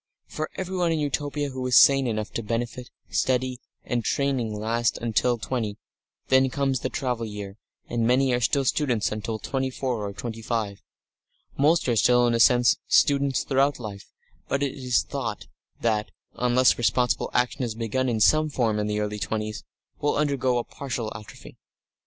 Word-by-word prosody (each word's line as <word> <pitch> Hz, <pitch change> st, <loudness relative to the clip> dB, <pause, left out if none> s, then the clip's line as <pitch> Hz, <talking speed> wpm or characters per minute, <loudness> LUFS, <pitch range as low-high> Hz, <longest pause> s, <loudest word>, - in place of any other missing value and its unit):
For 155 Hz, 0 st, -5 dB
everyone 180 Hz, -2 st, -1 dB
in 165 Hz, -, +1 dB
Utopia 145 Hz, 0 st, -2 dB
who 130 Hz, -1 st, -4 dB
is 125 Hz, -, +5 dB
sane 135 Hz, -2 st, +6 dB
enough 110 Hz, -2 st, -2 dB
to -, -, -3 dB
benefit, 120 Hz, +2 st, -4 dB, 0.2 s
study 130 Hz, -1 st, 0 dB, 0.3 s
and 120 Hz, -1 st, -1 dB
training 130 Hz, -3 st, 0 dB
last 115 Hz, +3 st, 0 dB
until 120 Hz, +1 st, +1 dB
twenty; 110 Hz, -2 st, -3 dB, 0.5 s
then 130 Hz, 0 st, +4 dB
comes 135 Hz, -1 st, 0 dB
the 130 Hz, -, -3 dB
travel 125 Hz, -4 st, -2 dB
year, 105 Hz, -1 st, -7 dB, 0.3 s
and 115 Hz, -1 st, 0 dB
many 130 Hz, +1 st, +3 dB
are 120 Hz, -, +1 dB
still 135 Hz, +3 st, +1 dB
students 125 Hz, -6 st, +1 dB
until 110 Hz, +1 st, -3 dB
twenty 130 Hz, +3 st, -2 dB
four 125 Hz, -4 st, -3 dB
or 100 Hz, -, -3 dB
twenty 115 Hz, +3 st, -6 dB
five. 110 Hz, -4 st, -3 dB, 0.7 s
Most 155 Hz, +3 st, +3 dB
are 120 Hz, -, +2 dB
still, 125 Hz, +2 st, +4 dB
in 120 Hz, -, +2 dB
a 115 Hz, -, +1 dB
sense, 120 Hz, +1 st, +5 dB
students 140 Hz, -1 st, +3 dB
throughout 140 Hz, +1 st, +2 dB
life, 105 Hz, -4 st, -8 dB, 0.4 s
but 140 Hz, +1 st, 0 dB
it 140 Hz, -, -1 dB
is 125 Hz, -3 st, 0 dB
thought 115 Hz, -7 st, -4 dB, 0.4 s
that, 110 Hz, -2 st, 0 dB, 0.2 s
unless 125 Hz, +1 st, +3 dB
responsible 120 Hz, -1 st, +1 dB
action 125 Hz, +2 st, 0 dB
is 115 Hz, -3 st, -3 dB
begun 120 Hz, +3 st, -1 dB
in 115 Hz, -2 st, 0 dB
some 155 Hz, +7 st, +4 dB
form 115 Hz, -6 st, 0 dB
in 105 Hz, -, -1 dB
the 105 Hz, 0 st, -1 dB
early 105 Hz, 0 st, -3 dB
twenties, 110 Hz, +1 st, -3 dB, 0.4 s
will 145 Hz, -, +1 dB
undergoes 135 Hz, -4 st, +1 dB
a -, -, -9 dB
partial 120 Hz, -5 st, -5 dB
atrophy. 105 Hz, +1 st, -12 dB
125 Hz, 170 wpm, -25 LUFS, 110-135 Hz, 0.7 s, sane